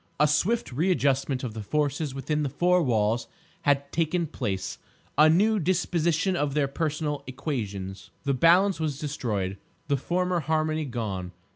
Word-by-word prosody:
A 150 - +5
swift 210 - +1
readjustment 140 -3 +1
of 120 -4 -4
the 110 - -5
forces 145 +3 -1
within 150 +3 -1
the 145 - 0
four 180 +6 +3
walls 115 -4 +1 0.3
had 140 -1 +1
taken 165 +1 +1
place—a 105 +6 -1
new 210 +6 +4
disposition 175 0 +1
of 145 -3 -1
their 145 -2 +2
personal 150 0 -2
equations. 105 - -4
The 140 -1 +1
balance 175 +7 +4
was 155 -4 -1
destroyed, 105 -10 -3 0.3
the 140 - +3
former 180 +5 0
harmony 155 0 0
gone. 100 -8 -4
150 Hz, 140 wpm, -27 LUFS, 125-165 Hz, 0.3 s, A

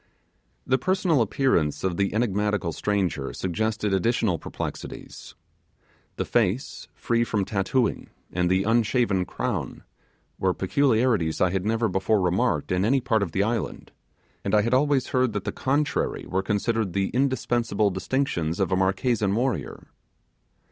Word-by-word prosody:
The 130 0 +2
personal 180 -3 +2
appearance 100 - +1
of 95 -2 0
the 100 +2 0
enigmatical 105 -5 0
stranger 90 -7 -1
suggested 105 +2 -1
additional 95 -3 +1
perplexities. - - -7 0.8
The - - -2
face, 115 +1 -1
free 115 0 +1
from 105 -4 -1
tattooing, 105 +4 0 0.2
and 90 0 +1
the 95 +1 +2
unshaven 115 -3 +2
crown, - - -4 0.6
were 95 -1 +1
peculiarities 110 - +1
I 90 - +3
had 95 +1 -1
never 115 +1 +1
before 95 +2 +1
remarked 90 -1 0
in 90 +1 +1
any 130 +6 +3
part 110 -3 +1
of 95 -5 -2
the 95 +4 +1
island, 110 0 -3 0.5
and 100 - +1
I 105 - +4
had 115 +3 0
always 140 0 +2
heard 130 -3 +1
that 105 - -3
the - - -2
contrary 145 +3 -1
were 95 +1 0
considered 105 -1 -1
the 95 +1 0
indispensable 120 -5 +1
distinction 95 - -1
of 95 -1 0
a - - +3
Marquesan 100 +2 +1
warrior. 115 - -2
105 Hz, 140 wpm, -25 LUFS, 95-120 Hz, 0.8 s, I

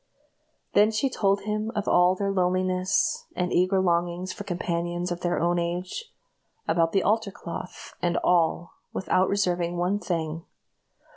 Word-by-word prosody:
Then 210 +1 +5
she 220 +5 0
told 200 -3 +1
him 215 +2 -2
of 210 - -2
all 180 +1 +4
their 200 +1 -1
loneliness, 185 0 +1
and 180 0 -1
eager 185 +2 +3
longings 175 0 0
for - - -7
companions 175 -1 -2
of 175 - -3
their 175 0 0
own 175 +1 +2
age; 180 - -4 0.6
about 165 -1 +2
the 195 - +2
altar 220 0 +1
cloth 180 -1 -8
and 175 -1 +1
all, 170 -1 +2 0.2
without 185 0 +1
reserving 175 -3 0
one 180 +4 +1
thing. 165 -4 -3
180 Hz, 145 wpm, -26 LUFS, 175-195 Hz, 0.6 s, Then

